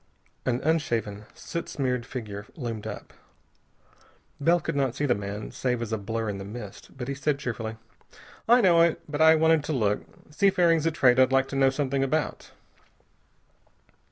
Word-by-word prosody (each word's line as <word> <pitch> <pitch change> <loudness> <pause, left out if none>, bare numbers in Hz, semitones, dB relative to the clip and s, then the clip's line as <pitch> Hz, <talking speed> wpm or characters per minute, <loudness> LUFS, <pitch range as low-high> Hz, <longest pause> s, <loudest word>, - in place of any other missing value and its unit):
An 125 0 +1
unshaven, 115 -10 -1
soot 170 - -6
smeared 125 -3 -2
figure 105 -5 -6
loomed 115 - -5
up. - - -8 1.3
Bell 170 +5 +3
could 150 - -4
not 135 -3 0
see 145 - -1
the 125 - +3
man 100 0 -5
save 125 -2 -1
as 115 -1 -4
a - - +1
blur 110 +2 -3
in 100 -2 -3
the - - -6
mist, 105 +3 -10
but 125 -2 -5
he 140 - -2
said 140 +1 -1
cheerfully: 115 -4 -5 0.7
"I 245 +1 +7
know 175 -5 +5
it, 170 -1 +3
but 150 0 -3
I 160 0 +7
wanted 160 -1 +3
to 155 - -2
look. 105 -6 0 0.3
Seafaring's 170 -2 +3
a - - +2
trade 130 -5 +4
I'd 130 0 +5
like 135 0 +3
to - - -5
know 135 -1 +4
something 135 0 -1
about." 150 +3 -2
135 Hz, 175 wpm, -26 LUFS, 115-155 Hz, 1.3 s, I